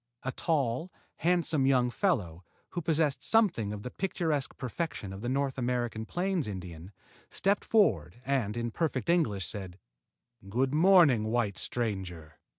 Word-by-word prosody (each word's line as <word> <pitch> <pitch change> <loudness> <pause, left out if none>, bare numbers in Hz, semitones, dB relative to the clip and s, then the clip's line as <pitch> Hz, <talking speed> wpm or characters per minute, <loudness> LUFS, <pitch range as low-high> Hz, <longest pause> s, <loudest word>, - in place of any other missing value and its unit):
A 130 - -2
tall, 145 +1 -1 0.3
handsome 165 -5 +2
young 125 -2 +3
fellow 100 - -1 0.3
who 175 - -4
possessed 155 -3 +1
something 180 - +3
of 105 -1 -6
the 125 - -6
picturesque 160 -7 -2
perfection 130 - -4
of 95 - -8
the 120 - -2
North 135 0 -1
American 120 -3 -2
plains' 180 - -1
Indian 90 -2 -7 0.4
stepped 200 +1 +1
forward 100 - +2
and, 125 -5 0
in 120 0 -2
perfect 155 0 -2
English, 110 - +1
said: 95 -4 -6 0.7
"Good 130 +6 0
morning, 160 - +6
white 110 -4 0
stranger. 95 -9 -4
125 Hz, 140 wpm, -30 LUFS, 105-165 Hz, 0.7 s, morning